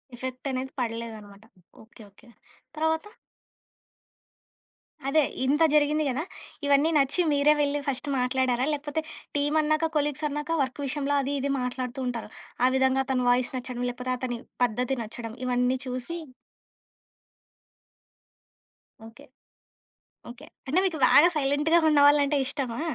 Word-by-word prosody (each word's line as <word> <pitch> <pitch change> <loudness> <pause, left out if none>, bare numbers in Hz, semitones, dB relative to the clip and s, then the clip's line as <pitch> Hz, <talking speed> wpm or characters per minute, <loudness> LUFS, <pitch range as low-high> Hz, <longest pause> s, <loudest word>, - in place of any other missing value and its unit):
Effect 255 +2 -5
అనేది 260 +1 -3
పడలేదనమాట. 225 -4 -5 0.4
Okay. 225 +1 -17
Okay. 245 +5 -21 0.5
తరవాత? 320 +2 0 2.0
అదే 305 +2 +4 0.2
ఇంత 295 +4 +3
జరిగింది 300 +1 +3
కదా! 265 +4 -2 0.4
ఇవన్నీ 285 +2 +4
నచ్చి 285 +5 +2
మీరే 290 +1 +4
వెళ్లి 290 0 +1
ఫస్ట్ 275 +1 -2
మాట్లాడారా? 255 0 +1
లేకపోతే, 295 +1 -3 0.4
టీమన్నాక, 310 +2 +1
కొలీగ్స్ 295 +1 -1
అన్నాక 295 +3 -2
వర్క్ 260 +2 -5
విషయంలో 285 +1 -1
అది, 275 +1 -2
ఇది 280 +1 -1
మాట్లాడుతూ 250 +1 -4
ఉంటారు. 235 -3 -4 0.4
ఆ - - +6
విధంగా 265 0 +3
అతని 260 -2 0
వాయిస్ 245 +1 +2
నచ్చడం. 250 -1 -5
లేకపోతే, 250 +1 -5
అతని 245 -2 -4 0.2
పద్ధతి 245 +3 0
నచ్చడం. 225 +1 -7
ఇవన్నీ 250 +1 +1
చూసి 255 +7 -4 2.9
ఓకే. 225 +1 -14 1.1
ఓకే. 255 +5 -12 0.2
అంటే 300 +7 +2
మీకు 335 -4 -2
బాగా 290 +7 +7
సైలెంట్‌గా 295 +3 +2
ఉన్నవాళ్ళంటే 290 0 +5
ఇష్టమా? 260 -3 -3
270 Hz, 120 wpm, -26 LUFS, 250-295 Hz, 2.9 s, బాగా